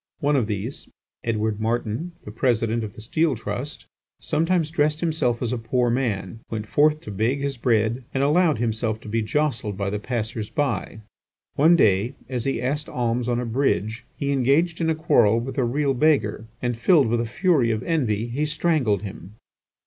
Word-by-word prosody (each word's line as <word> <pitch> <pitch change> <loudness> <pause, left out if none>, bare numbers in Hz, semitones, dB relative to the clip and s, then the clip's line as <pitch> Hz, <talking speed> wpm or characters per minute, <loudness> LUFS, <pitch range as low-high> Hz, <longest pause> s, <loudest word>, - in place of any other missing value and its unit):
One 145 +1 +2
of 125 -6 +1
these, 105 +5 -4 0.4
Edward 110 -2 -1
Martin, 115 +8 -2
the 105 - -7
President, 115 -1 +1
of 105 -2 -6
the - - -10
Steel 155 +6 +1
Trust, 120 +7 -5 0.3
sometimes 165 0 0
dressed 150 -1 +1
himself 155 -8 0
as 120 0 -1
a 125 - -2
poor 120 +1 +1
man, 115 -5 -2
went 110 -1 -4
forth 150 +6 +3
to 105 - -8
beg 115 +8 0
his 140 -1 -2
bread, 115 0 +1
and 135 - 0
allowed 155 0 +3
himself 110 -1 -1
to - - -12
be 115 +2 0
jostled 110 -4 -1
by 100 -1 -2
the 105 - -2
passers 110 -1 -3
by. 120 -6 -2 0.5
One 160 +5 +5
day, 110 - +3
as 125 -2 -3
he 135 - 0
asked 145 +4 -2
alms 120 0 -1
on 120 0 +1
a 125 - -2
bridge, 115 -2 0
he 140 0 -1
engaged 140 +6 +2
in 160 - +1
a 160 - +2
quarrel 120 - +3
with 135 +4 -4
a - - +3
real 135 +3 +1
beggar, 125 -6 +1 0.2
and 120 -1 0
filled 150 +5 +4
with 115 +1 +1
a - - -2
fury 140 - +2
of 110 +1 -1
envy, 120 -10 0
he 135 +6 -2
strangled 150 - +1
him. 100 0 -9
120 Hz, 185 wpm, -24 LUFS, 110-145 Hz, 0.5 s, One